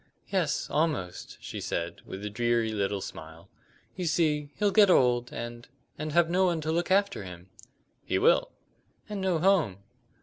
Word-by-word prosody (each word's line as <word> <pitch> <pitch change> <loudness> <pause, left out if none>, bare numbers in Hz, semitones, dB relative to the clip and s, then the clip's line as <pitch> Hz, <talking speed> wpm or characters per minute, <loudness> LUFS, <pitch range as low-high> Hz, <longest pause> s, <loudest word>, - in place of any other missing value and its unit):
"Yes, 180 -7 0
almost," 150 - -2
she - - -6
said, 85 0 -3
with 95 +2 -7
a - - -2
dreary 120 0 +1
little 100 -1 -1
smile. 80 +2 -9 0.5
"You 185 - -3
see, 150 -3 +1
he'll 205 -1 +1
get 205 -1 +6
old, 125 -6 +3
and 120 0 -7 0.3
and 155 0 -4
have 170 0 +4
no 185 +3 +2
one 170 -2 0
to 155 +1 -2
look 170 +3 0
after 195 - +2
him." 90 0 -10 0.5
"He - - 0
will." - - +4 0.6
"And 210 -2 -4
no 185 -3 +1
home." 160 - +2
150 Hz, 165 wpm, -28 LUFS, -, 0.6 s, get